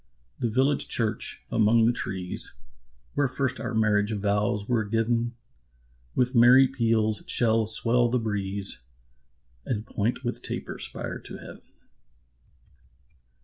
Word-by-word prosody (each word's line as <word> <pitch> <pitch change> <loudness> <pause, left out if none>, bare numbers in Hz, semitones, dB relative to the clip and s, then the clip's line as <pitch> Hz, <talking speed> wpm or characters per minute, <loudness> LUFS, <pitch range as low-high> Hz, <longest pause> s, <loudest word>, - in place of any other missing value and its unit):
The 120 - 0
village 135 +5 +1
church, 110 -2 0
among 115 +1 +4
the 120 - +3
trees, 95 -6 -3 0.6
Where 145 -1 +1
first 130 0 -2
our 120 -1 -4
marriage 105 -1 +2
vows 105 0 -1
were 120 -3 +1
giv'n, 115 +2 0 0.8
With 125 +1 +1
merry 125 +2 +7
peals 115 -4 0
shall 115 -2 +2
swell 120 +2 +3
the 125 - +1
breeze, 100 - -1 0.8
And 110 - -3
point 115 +6 -2
with 120 -1 -2
taper - - -5
spire - - -2
to - - -9
heav'n. - - -12
115 Hz, 120 wpm, -26 LUFS, 105-120 Hz, 0.8 s, merry